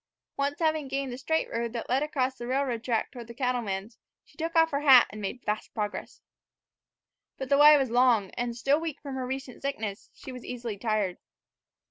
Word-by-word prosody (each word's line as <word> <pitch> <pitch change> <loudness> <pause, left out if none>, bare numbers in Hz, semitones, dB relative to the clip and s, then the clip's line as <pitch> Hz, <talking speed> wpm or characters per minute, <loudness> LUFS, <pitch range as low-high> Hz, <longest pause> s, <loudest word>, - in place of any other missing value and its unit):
Once 280 +1 -1
having 315 -3 0
gained 270 -1 -3
the - - -6
straight 320 +4 0
road 235 0 -2
that 235 - -4
led 260 +3 +1
across 270 -4 0
the 240 - -7
railroad 255 -3 -1
track 235 -4 -1
toward 240 -4 -9
the 235 - -10
cattleman's, 230 -5 -2 0.3
she - - -24
took 330 0 -4
off 325 0 +5
her 280 - 0
hat 265 -4 +8
and 210 +1 -8
made 210 +5 -5
faster 210 0 -2
progress. 210 -2 -4 1.1
But 265 -1 -5
the 280 - +4
way 300 0 +9
was 265 -4 0
long, 240 -5 +3
and, 240 -1 -3
still 275 +5 +2
weak 320 -3 -4
from 280 -2 -7
her 260 -1 -3
recent 265 -1 -6
sickness, 220 -7 -4
she 265 - -9
was 250 -2 -9
easily 235 -4 -5
tired. 210 -5 -1
255 Hz, 200 wpm, -28 LUFS, 230-280 Hz, 1.1 s, way